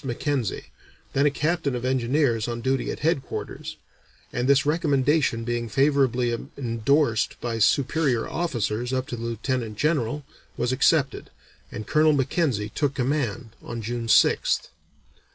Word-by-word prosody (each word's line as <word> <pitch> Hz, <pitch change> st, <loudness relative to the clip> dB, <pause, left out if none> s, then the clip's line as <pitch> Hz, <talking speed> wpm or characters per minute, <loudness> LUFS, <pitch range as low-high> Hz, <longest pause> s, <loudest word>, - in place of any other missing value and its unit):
Mackenzie, 130 Hz, -3 st, -2 dB, 0.5 s
then 140 Hz, +2 st, +3 dB
a -, -, +5 dB
captain 150 Hz, -1 st, -1 dB
of 125 Hz, 0 st, -4 dB
engineers 130 Hz, -2 st, +1 dB
on 120 Hz, 0 st, -3 dB
duty 130 Hz, +2 st, 0 dB
at -, -, -5 dB
headquarters, 155 Hz, -3 st, -3 dB, 0.6 s
and 125 Hz, +1 st, -1 dB
this 140 Hz, +1 st, +4 dB
recommendation 145 Hz, -5 st, +1 dB
being 120 Hz, 0 st, -2 dB
favorably 135 Hz, -2 st, +2 dB, 0.3 s
endorsed 120 Hz, 0 st, +1 dB
by 115 Hz, -2 st, -3 dB
superior 135 Hz, +1 st, +2 dB
officers 120 Hz, -7 st, -2 dB
up 130 Hz, 0 st, -1 dB
to -, -, -3 dB
the 115 Hz, -, -8 dB
Lieutenant 115 Hz, -1 st, -3 dB
General, 145 Hz, -1 st, 0 dB, 0.3 s
was 125 Hz, -, 0 dB
accepted, 140 Hz, +1 st, +2 dB, 0.4 s
and 110 Hz, -, -6 dB
Colonel 155 Hz, +4 st, +4 dB
Mackenzie 135 Hz, -, 0 dB
took 140 Hz, -2 st, 0 dB
command 125 Hz, -4 st, -1 dB
on 115 Hz, -1 st, -6 dB
June 120 Hz, +1 st, -3 dB
6th. 110 Hz, -, +3 dB
130 Hz, 135 wpm, -25 LUFS, 115-145 Hz, 0.6 s, a